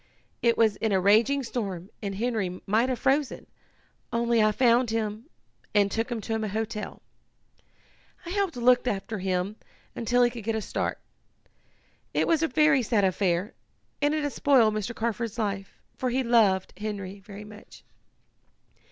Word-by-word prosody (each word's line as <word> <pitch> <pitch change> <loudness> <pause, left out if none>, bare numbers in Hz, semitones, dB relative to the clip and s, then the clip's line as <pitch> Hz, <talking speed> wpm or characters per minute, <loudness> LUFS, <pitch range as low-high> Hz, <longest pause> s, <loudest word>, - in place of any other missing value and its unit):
It 235 -1 +3
was 220 -3 +3
in 220 - -1
a 190 - +3
raging 225 +9 +4
storm 200 -6 -4
and 200 -2 -4
Henry 205 -5 -2
might 225 +6 +2
have 255 - -1
frozen, 275 +2 0 0.7
only 235 -1 +2
I 215 0 +4
found 240 +1 +3
him 220 +3 -3 0.5
and 200 -1 +4
took 225 +4 -1
him 235 - -2
to 225 - -4
a - - -1
hotel. 215 +1 -4 1.2
I 340 - -6
helped 395 -3 0
look 245 +1 +3
after 210 -1 -2
him 185 +2 -1 0.4
until 245 +2 +2
he 240 - +3
could 235 -2 -8
get 225 +1 -1
a 220 - -1
start. - - -2 1.2
It - - +2
was 330 -2 +3
a 325 - +2
very 300 0 +4
sad 225 -3 +1
affair, 185 +2 0 0.5
and 295 +1 +2
it 305 - -1
has 290 - -2
spoiled 245 -7 +4
Mr. 215 +2 -3
Carford's 230 0 -2
life, 200 -3 -3 0.2
for 255 - -1
he 260 +2 0
loved 215 -6 +3
Henry 200 -2 -5
very 200 +1 -10
much." 210 0 -14
225 Hz, 160 wpm, -27 LUFS, 205-245 Hz, 1.2 s, raging